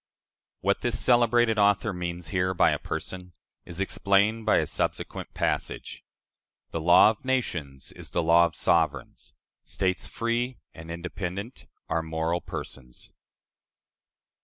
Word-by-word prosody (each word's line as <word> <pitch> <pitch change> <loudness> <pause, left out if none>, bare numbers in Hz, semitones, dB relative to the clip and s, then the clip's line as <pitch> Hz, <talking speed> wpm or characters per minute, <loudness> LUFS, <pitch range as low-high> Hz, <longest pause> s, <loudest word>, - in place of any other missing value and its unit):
" - - -67
What 100 +1 +1
this 120 -2 -1
celebrated 120 -2 +3
author 100 0 +3
means 85 -1 -4
here 95 -1 0
by - - +4
a - - -1
person, 90 +2 -6 0.3
is 85 +1 -8
explained 100 +3 +1
by - - +5
a - - +2
subsequent - - -3
passage: - - -3 0.7
"The 80 - -3
law 85 +5 +7
of 110 - -12
nations 85 - -3
is - - -12
the 85 - -1
law 85 +1 +6
of 80 - -12
sovereigns; 75 -5 -1 0.3
states 95 -2 -1
free 120 +1 -2 0.2
and 80 0 -11
independent 90 +6 -6 0.2
are 80 - 0
moral 80 +2 -2
persons." 60 -3 -9
90 Hz, 135 wpm, -27 LUFS, 85-110 Hz, 0.7 s, law